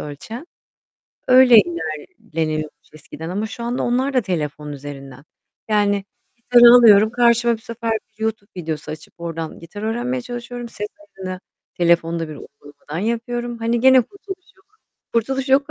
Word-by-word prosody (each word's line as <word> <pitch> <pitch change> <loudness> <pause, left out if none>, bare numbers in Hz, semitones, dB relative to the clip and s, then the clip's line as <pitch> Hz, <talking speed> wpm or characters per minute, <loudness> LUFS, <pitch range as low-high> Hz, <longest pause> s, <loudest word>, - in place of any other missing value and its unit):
ölçen. 220 - -8 0.8
Öyle 255 -3 +8
ilerleniyormuş 155 - -5
eskiden 155 +2 -9
ama 205 +4 -2
şu 235 +1 -8
anda 240 +1 -2
onlar 260 +3 0
da 255 - +3
telefon 150 -6 -3
üzerinden. 140 -1 -9 0.4
Yani 205 -2 +2 0.3
gitar 240 0 +3
alıyorum, 230 -3 +8
karşıma 235 -1 +3
bu - - -4
sefer 230 0 -5 0.3
YouTube 220 -1 -3
videosu 160 -3 -4
açıp 155 - -10
oradan 165 -1 -5
gitar 190 +5 -9
öğrenmeye 240 +3 -2
çalışıyorum. 240 -1 -7
Ses 210 -1 -5
ayarını 190 -12 -8 0.4
telefonda 170 -1 +2
bir 155 - -7
uygulamadan 145 +2 -11
yapıyorum. 240 +1 -3
Hani 230 +1 0
gene 260 +1 +6
kurtuluş 385 - -10
yok. 385 - -28 0.5
Kurtuluş 265 +4 -1
yok 275 +2 +3
220 Hz, 140 wpm, -20 LUFS, 165-240 Hz, 0.8 s, Öyle